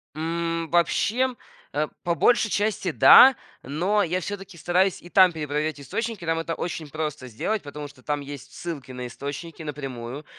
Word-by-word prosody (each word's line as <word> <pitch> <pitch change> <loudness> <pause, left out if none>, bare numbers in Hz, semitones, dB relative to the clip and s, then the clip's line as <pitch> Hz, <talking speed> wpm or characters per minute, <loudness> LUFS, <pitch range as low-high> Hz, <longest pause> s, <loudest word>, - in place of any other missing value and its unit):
М, 165 +1 -2
вообще, 235 +9 +2 0.4
а, 150 +1 0 0.2
по 170 -1 0
большей 235 -1 +3
части, 205 -4 0
да, 260 - +9 0.3
но 185 +10 +1
я 180 +2 -1
всё-таки 195 -2 -7
стараюсь 180 +3 +1
и 175 - -13
там 185 -1 +6
перепроверять 150 -1 -2
источники. 215 - -4
Там 165 0 +1
это 165 0 -3
очень 160 -3 -5
просто 150 -4 -4
сделать, 205 - -2
потому 145 0 -7
что 140 -3 -18
там 145 -1 -1
есть 140 -1 -9
ссылки 145 -7 -6
на 125 -1 -6
источники 145 +6 -7
напрямую. 135 -1 -6
165 Hz, 160 wpm, -25 LUFS, 145-185 Hz, 0.4 s, да